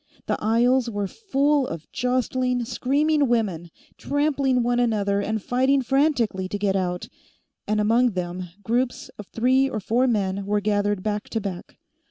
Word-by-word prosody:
The - - 0
aisles 240 +3 +3
were 205 -2 -2
full 285 - 0
of 165 -1 -6
jostling, 250 0 0
screaming 290 +4 +1
women, 200 -8 -1 0.3
trampling 280 -3 +1
one 245 0 +1
another 205 -4 +1
and 220 +2 -2
fighting 260 +5 +1
frantically 245 -8 +1
to 205 - -3
get 200 -1 0
out, 180 -2 -2 0.6
and, 215 +1 +1
among 230 +3 +3
them, 180 0 -4 0.2
groups 245 +2 -1
of 205 - -8
three 260 +3 +2
or 220 - -3
four 235 +6 +1
men 200 -4 -1
were 210 0 +1
gathered 205 -1 0
back 210 -1 -3
to 225 - -1
back. 195 -4 -7
230 Hz, 155 wpm, -24 LUFS, 205-255 Hz, 0.6 s, aisles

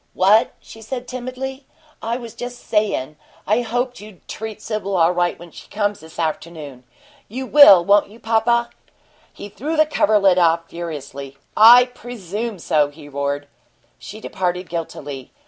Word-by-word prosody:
"What?" 205 +4 +3
she 225 - -14
said, 245 +2 -6
timidly. 255 +2 -6 0.3
"I 230 +2 -2
was 235 -3 -9
just 245 0 -8
sayin' 200 - -1 0.3
I 215 +4 +2
hoped 245 +2 -3
you'd 210 -3 -15
treat 220 -1 -7
Sibyl 205 -3 -3
all 165 0 +4
right 175 0 0
when 170 0 -13
she - - -13
comes, 205 -1 -1
this 160 0 -15
afternoon. 155 -5 -5 0.4
You 260 +5 -5
will, 205 -12 +8
won't 200 +1 +4
you, 220 +3 -16
papa?" 235 +1 +1 0.6
He - - -10
threw 300 +10 -4
the 310 - +5
coverlet 200 -10 +3
off 165 -1 +2
furiously. 140 -5 -7 0.2
"I 240 +3 +8
presume 230 -3 -6
so!" 150 -3 +1
he 145 0 -14
roared. 140 0 -3 0.5
She 215 - -10
departed 180 -3 -3
guiltily. 145 -5 -6
205 Hz, 150 wpm, -20 LUFS, 165-235 Hz, 0.6 s, will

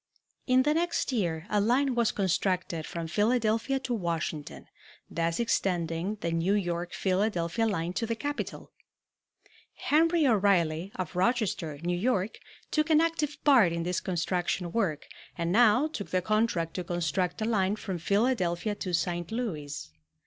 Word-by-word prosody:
In 255 0 +5
the 295 +2 +2
next 340 -2 0
year 170 -9 -1
a 210 -2 +1
line 255 +5 +2
was 235 -2 +2
constructed 185 -3 -1
from 170 -1 -4
Philadelphia 225 +7 +1
to 250 - -2
Washington, 165 -7 -3 0.5
thus 165 0 -1
extending 180 -4 0
the 170 - -1
New 165 +5 +1
York 175 -3 -2
Philadelphia 195 +2 0
line 175 -4 -2
to 230 +4 -2
the 230 - -1
capital. 290 +5 -5 1.0
Henry 325 +1 +3
O'Reilly, 190 - +2
of 180 -3 -5
Rochester, 185 - 0
New 175 +1 0
York, 205 0 0 0.3
took 305 +1 +1
an 310 -1 +6
active 320 -3 0
part 250 - +6
in 170 0 -2
this 180 +1 -1
construction 180 0 -1
work 175 -9 -1 0.3
and 170 0 -1
now 240 +5 +5
took 300 -10 -5
the 185 -1 0
contract 215 -6 0
to 180 - -3
construct 175 +1 -1
a 215 - -1
line 205 -3 +1
from 190 -4 -5
Philadelphia 200 -1 +1
to 185 -3 -5
St. 175 0 -2
Louis. 150 - -4
190 Hz, 150 wpm, -29 LUFS, 170-230 Hz, 1.0 s, an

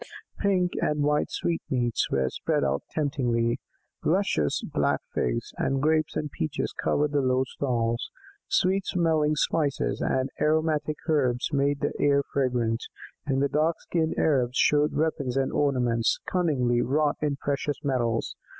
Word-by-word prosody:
Pink 185 -3 +2
and 150 -1 +1
white 150 0 +1
sweetmeats 125 -8 -1
were 65 -1 +1
spread - - -1
out 70 +1 0
temptingly; 125 -6 0 0.4
luscious 155 - +1
black - - 0
figs, - - -1
and 135 - +1
grapes 155 +2 +1
and 150 -1 -2
peaches 80 - -3
covered 150 0 0
the 145 -1 +2
low 130 0 +2
stalls; 120 -3 -2 0.4
sweet 190 +1 +2
smelling 160 -4 +2
spices 150 -2 0
and 130 0 0
aromatic 155 -1 +1
herbs 135 -4 +1
made 140 0 +1
the - - 0
air 140 -1 +3
fragrant, 120 -3 0 0.5
and 135 0 +2
dark 155 +3 +1
skinned 160 -2 -1
Arabs 130 -5 +2
showed 150 0 +3
weapons 140 -5 0
and 135 -1 +1
ornaments, 125 -5 +1
cunningly 130 -10 +1
wrought 145 +4 +1
in 150 -2 0
precious 140 +1 -2
metals. 120 -5 -1
140 Hz, 135 wpm, -26 LUFS, 125-155 Hz, 0.5 s, air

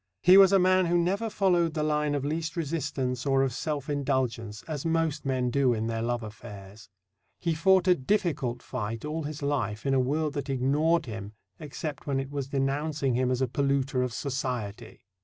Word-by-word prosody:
He 180 +2 +8
was 195 -1 +8
a 195 - +6
man 185 -1 +3
who 175 +1 +2
never 195 +6 0
followed 175 -6 +1
the 155 - 0
line 150 -1 +1
of 140 -1 -2
least 160 +3 -3
resistance 135 -5 -2
or 135 -1 +2
of 135 -3 -1
self 145 0 -3
indulgence, 130 -7 -2
as 150 -4 -5
most 165 -3 0
men 130 -2 0
do 130 -2 +2
in 110 0 -2
their 115 0 -2
love 120 0 -1
affairs. 105 -1 -11 0.5
He 170 -2 0
fought 190 +3 +3
a 180 - +7
difficult 145 - -1
fight 115 0 -4
all 155 +2 -3
his 150 -1 -6
life 120 -7 -2
in 135 - +2
a 135 - +3
world 150 +4 0
that 145 -1 -4
ignored 150 +6 +2
him, 110 -3 -7 0.3
except 150 -1 -6
when 135 -2 0
it 135 +1 -5
was 140 -2 -3
denouncing 140 0 -1
him 125 +1 +1
as 130 +1 0
a - - +1
polluter 135 0 0
of 125 -1 -1
Society. 120 -5 -4
140 Hz, 195 wpm, -28 LUFS, 125-160 Hz, 0.5 s, He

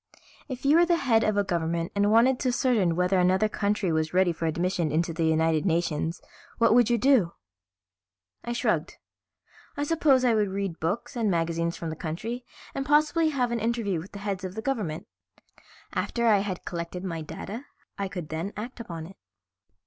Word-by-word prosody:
If 260 0 -6
you 295 +3 +6
were 345 - +6
the 345 - +4
head 230 -7 +3
of 215 -1 +1
a 205 - +3
government 170 -2 -1
and 205 0 +2
wanted 245 +3 +4
to 255 - 0
ascertain 235 - +2
whether 180 +2 +2
another 185 +4 +3
country 205 -3 0
was 160 +1 -1
ready 185 -1 +4
for 165 0 -3
admission 170 0 0
into 165 +2 0
the 165 0 0
United 160 -1 +2
Nations, 165 -2 -1 0.3
what 230 - +4
would 240 -1 +5
you 240 - +3
do?" 235 -8 +3 1.1
I 240 - -4
shrugged. 240 - -1 0.8
"I 290 - 0
suppose 290 -4 +3
I 240 - +4
would 210 -2 +2
read 195 -3 -3
books 200 - -2
and 225 -3 +1
magazines 170 -1 0
from 165 -1 -4
the - - -5
country 215 +11 -5 0.3
and 275 - -2
possibly 305 +3 +3
have 255 -5 0
an 235 - 0
interview 225 -5 -1
with 175 +5 -10
the - - -6
heads 195 -2 -2
of 185 0 -5
the 220 - -4
government. 210 - -2 0.9
After 235 -1 -1
I 215 -3 +5
had 195 -3 -4
collected 170 +1 -5
my 165 -4 -4
data 210 - -7 0.3
I 200 - -1
could 180 -5 -6
then 165 +6 -4
act 240 +4 -6
upon 170 -8 -6
it." 190 +3 -13
195 Hz, 190 wpm, -27 LUFS, 170-235 Hz, 1.1 s, you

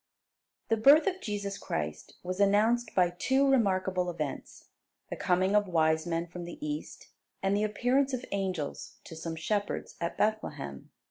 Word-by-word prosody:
The 225 - +3
birth 280 +8 +7
of 380 -1 -1
Jesus 200 -2 -4
Christ 75 -1 -4
was 185 +1 -4
announced 215 +4 +3
by 180 -2 +4
two 265 +10 +2
remarkable 190 -7 +2
events: 155 -5 -6 0.4
the - - -2
coming 185 +2 +1
of 205 -1 +3
wise 160 -1 +2
men 165 0 -1
from 175 0 -8
the 175 - -8
East, 300 0 -6 0.3
and 195 +1 +2
the 205 - +1
appearance 250 +6 +1
of 255 -1 -3
angels 185 -7 -3
to 165 - -10
some 165 0 -5
shepherds 205 +5 -2
at 170 +1 -2
Bethlehem. 210 - -2
195 Hz, 155 wpm, -30 LUFS, 170-225 Hz, 0.4 s, birth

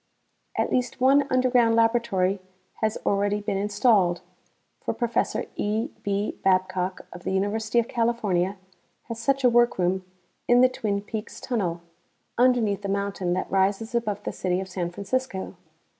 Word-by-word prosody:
At - - 0
least 250 -1 -1
one 275 +2 +4
underground 250 -3 +3
laboratory 225 -5 +2 0.4
has 220 0 0
already 205 +1 +1
been 205 -1 -2
installed, 200 -4 +2 0.6
for - - -2
Prof. 235 -2 0 0.2
E. 220 +6 -1
B. 200 +1 -2
Babcock 185 -1 +1
of 175 - -9
the - - -2
University 210 +4 0
of 235 -1 +3
California 210 -6 0 0.5
has 230 -1 -5
such 275 +3 +1
a - - +7
workroom 190 -6 +2 0.4
in 245 0 +6
the 255 - +6
Twin 200 -5 -2
Peaks 220 +1 -6
Tunnel, 180 -9 -2 0.5
underneath 235 -5 +3
the 200 - -4
mountain 200 -2 -1
that 185 - -3
rises 195 +4 +1
above 230 -4 -1
the - - -4
city 180 -1 -1
of 190 - -4
San 180 -2 -3
Francisco. 200 +2 -3
205 Hz, 145 wpm, -25 LUFS, 190-235 Hz, 0.6 s, a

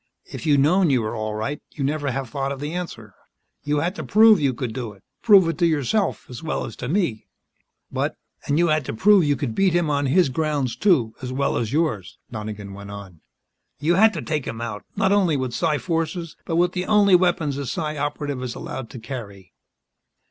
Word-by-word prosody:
"If - - -7
you'd 145 -2 +4
known 175 +4 +4
you 130 -4 +2
were 110 - -3
all 110 -1 -3
right, 140 +7 -3
you'd 140 - -4
never 145 0 -1
have 135 +1 -3
thought 135 +2 -3
of 140 - -5
the 150 +3 -4
answer. 115 - -6 0.5
You 145 0 0
had 175 +4 -1
to - - -4
prove 220 -2 +6
you 140 -3 +2
could 125 -2 -4
do 115 -3 -5
it 100 0 -22 0.2
prove 200 -6 +6
it 165 -3 -2
to 170 - +4
yourself 165 - 0
as 125 - -9
well 160 -2 -2
as 115 - -8
to - - -5
me." 165 - -1 0.6
"But - - -1 0.2
" - - -27
"And 145 - +1
you 170 0 +3
had 155 -1 +2
to - - -4
prove 200 - +5
you 145 -1 +2
could 130 -3 -3
beat 190 +6 +2
him 170 -3 +1
on 140 -1 +1
his 165 +2 +3
grounds, 145 -2 -1
too, 135 - +2
as 125 -1 -5
well 140 +2 0
as 115 -2 -1
yours," 140 - -1
Donegan 105 -3 -6
went 100 +1 -9
on. 100 -5 -10 0.6
"You 155 +5 +2
had 215 +5 +6
to 165 - -4
take 150 -4 -2
him, - - -5
not 115 - -2
only 185 -7 +3
with 130 -2 -3
psi 155 0 +1
forces, 165 0 -3
but 165 - -2
with 175 +1 +3
the 180 0 -3
only 205 -2 +4
weapons 175 -6 +3
a 140 -2 -4
Psi 155 0 -3
Operative 145 -2 -3
is 125 -2 -4
allowed 130 -4 -6
to 120 - -9
carry." 110 -6 -8
145 Hz, 220 wpm, -23 LUFS, 120-170 Hz, 0.6 s, prove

